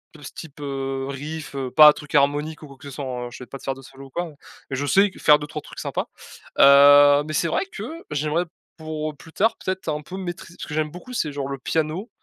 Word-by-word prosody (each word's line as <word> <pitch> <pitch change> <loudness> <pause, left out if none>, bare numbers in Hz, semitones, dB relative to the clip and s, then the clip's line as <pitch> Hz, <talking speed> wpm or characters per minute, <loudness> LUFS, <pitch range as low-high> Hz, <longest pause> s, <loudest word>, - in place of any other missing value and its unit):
de 150 - -14
ce - - -8
type, 155 -3 -11
heu, 135 -1 -3
riff, 145 +2 -6
heu, 135 -2 -3
pas 150 +3 +9
truc 150 +1 -8
harmonique 145 +2 +1
ou - - -9
quoi 140 -1 -14
que 145 - -15
ce - - -9
soit, 140 +2 -6
hein, 125 -1 -4
heu, - - -9
je 125 - -9
vais - - -13
pas 135 - -8
te - - -18
faire 135 - -1
de 135 - -12
solo 135 +1 -13
ou - - -18
quoi, 175 +5 -3
heu, 150 - -16 0.3
mais 135 - -3
je 140 - -2
sais 195 +7 +4
que - - -15
faire 150 - +6
2-3 150 0 -6
trucs - - -11
sympas. - - -3 0.5
Heu, 145 +1 +8
mais 155 - -4
c'est 165 +3 +1
vrai 165 - 0
que 390 - -8 0.3
j'aimerais 150 +4 0 0.3
pour 155 -1 -5
plus 160 - -15
tard 225 +3 +2
peut-être 185 -2 -4
un 150 0 -2
peu 165 +5 -9
maîtriser 175 -2 -7
parce - - -7
que 150 - -4
j'aime 155 -1 -1
beaucoup, 180 +10 -11
c'est 155 -11 -1
genre 140 -1 -4
le 140 - -4
piano, 160 - -2
150 Hz, 270 wpm, -23 LUFS, 140-160 Hz, 0.5 s, pas